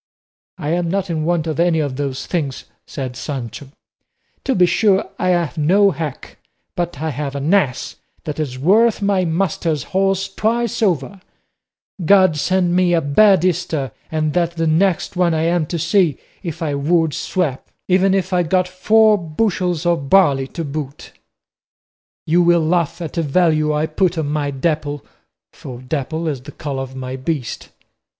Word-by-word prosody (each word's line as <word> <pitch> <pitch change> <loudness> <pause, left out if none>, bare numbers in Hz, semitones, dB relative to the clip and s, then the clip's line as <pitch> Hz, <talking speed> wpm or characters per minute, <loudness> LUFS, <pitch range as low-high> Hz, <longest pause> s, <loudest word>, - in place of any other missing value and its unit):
"I 150 - -4
am 170 +1 0
not 195 0 -1
in 155 -2 -2
want 170 -1 0
of 155 -2 -3
any 170 -1 +3
of 145 -4 -2
those 135 -1 -3
things," 145 -7 -3 0.2
said 130 -3 -5
Sancho; 135 -1 -6 0.8
"to 265 - 0
be 180 - +5
sure 195 +1 +2
I - - 0
have 170 -3 0
no 195 +6 +4
hack, 155 -3 -6 0.4
but 175 -5 -3
I 160 - -1
have 140 0 -4
an 140 +6 0
ass 145 -11 0 0.3
that 150 0 -5
is 135 -5 -3
worth 210 - +3
my 195 -2 +2
master's 165 -3 -1
horse 195 0 +1
twice 235 +2 -1
over; 185 -2 0 0.8
God 185 -2 +5
send 180 +3 +1
me 180 -1 +3
a - - +3
bad 185 +5 +4
Easter, 160 -7 -1 0.2
and 155 -1 -1
that 170 0 0
the 165 -1 -1
next 170 +4 +1
one 175 -2 +2
I 160 - 0
am 170 -1 +1
to 170 - -3
see, 170 -2 +2 0.2
if 170 -2 -5
I 150 -3 -1
would 160 +2 +1
swap, 160 -9 -2 0.2
even 190 +1 +3
if 190 -1 -1
I 180 - +3
got 180 +2 +1
four 215 +3 +3
bushels 175 0 -1
of 165 -6 0
barley 145 -9 +4
to 165 - -5
boot. 140 -1 -6 1.1
You 170 +3 +3
will 170 -2 +3
laugh 170 0 0
at 160 - -6
the 170 - 0
value 155 0 +2
I 150 +1 0
put 170 +2 0
on 155 -3 -1
my 150 -1 -1
Dapple 145 +1 -2 0.5
for 125 -2 -9
dapple 155 +5 -3
is 140 -5 -3
the 145 +3 -10
colour 140 -2 -5
of 130 0 -7
my 130 0 -5
beast. 130 -2 -4
165 Hz, 170 wpm, -19 LUFS, 145-180 Hz, 1.1 s, be